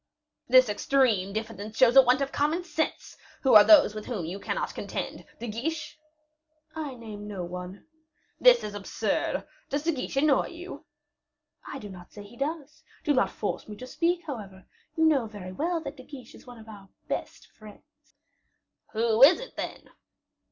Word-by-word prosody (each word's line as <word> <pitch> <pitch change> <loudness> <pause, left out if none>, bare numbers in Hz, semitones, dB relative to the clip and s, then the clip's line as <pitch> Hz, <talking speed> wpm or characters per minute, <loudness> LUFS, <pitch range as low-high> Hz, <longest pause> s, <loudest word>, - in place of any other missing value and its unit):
"This 255 0 +6
extreme 210 -3 +1
diffidence 215 0 -6
shows 250 -1 +5
a 270 - +11
want 255 +1 +3
of 275 0 -1
common 310 +5 0
sense. 320 -2 -3 0.3
Who 265 - +4
are 210 - +10
those 305 -7 +7
with 215 0 -7
whom 210 -10 -3
you 180 +5 -5
cannot - - -3
contend? - - -5
De 240 - -5
Guiche?" 305 +9 -4 0.8
"I 300 -5 -5
name 215 -3 -9
no 195 -3 -5
one." 180 +2 -8 0.5
"This - - +6
is 210 - -5
absurd. 205 -1 -2 0.2
Does 285 +1 -2
De 335 - +2
Guiche 270 -2 -5
annoy 285 -1 +3
you?" 355 +2 -10 0.8
"I - - -6
do 210 - -8
not 180 -2 -12
say 205 - -10
he 205 +4 -15
does; 300 +2 -4 0.2
do 295 - +2
not 260 - +2
force 210 - -4
me 210 - -7
to 250 - -9
speak, 345 +6 0
however; 200 - -8 0.3
you 320 - +4
know 280 -7 +3
very 205 -4 -9
well 330 - -1
that 300 -1 -7
De 255 - -11
Guiche 255 -4 -12
is - - -16
one 245 -1 -11
of 225 0 -14
our 200 -3 -12 0.2
best - - -5
friends." 295 +8 -18 0.8
"Who 225 +1 +1
is 310 +9 +8
it, - - -10
then?" - - -6
250 Hz, 180 wpm, -27 LUFS, 210-300 Hz, 0.8 s, a